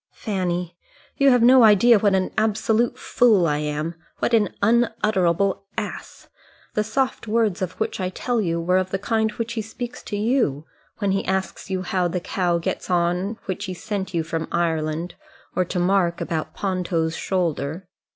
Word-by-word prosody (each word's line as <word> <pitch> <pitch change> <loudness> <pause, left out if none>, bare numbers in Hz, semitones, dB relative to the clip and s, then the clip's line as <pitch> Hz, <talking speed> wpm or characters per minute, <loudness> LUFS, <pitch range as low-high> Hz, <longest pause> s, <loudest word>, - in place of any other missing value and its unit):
"Fanny, 180 -4 -3 0.4
you 275 0 +5
have 245 -2 +4
no 255 +1 +7
idea 220 +1 +6
what 200 -1 +3
an 185 -1 0
absolute 220 +2 +1
fool 220 -8 +3
I 150 -2 +1
am, 150 +2 -2 0.2
what - - -1
an 215 -3 +4
unutterable 200 -4 +1
ass. 210 -2 -6 0.5
The 210 - +1
soft 255 +2 -1
words 215 -3 +1
of 185 -1 -2
which 220 - -2
I 185 -1 -1
tell 235 +5 -1
you 170 -3 -1
were 180 +2 +2
of 185 0 -2
the 195 - -1
kind 220 +2 0
which 230 +1 -4
he 225 - -2
speaks 240 +3 -7
to 205 - -3
you 210 - +1 0.3
when 200 -2 0
he 195 - 0
asks 190 0 -2
you 185 -1 -2
how 185 -1 0
the 175 +1 -2
cow 175 -1 0
gets 170 - -4
on 180 +4 0
which 195 +1 -3
he 185 -2 -5
sent 205 -1 -4
you 170 -3 0
from 165 0 -3
Ireland, 165 0 -1 0.4
or 185 - +3
to 175 - -4
Mark 180 -1 +2
about 160 -2 -3
Ponto's 175 -4 -1
shoulder. 170 -1 -2
190 Hz, 175 wpm, -23 LUFS, 175-220 Hz, 0.5 s, no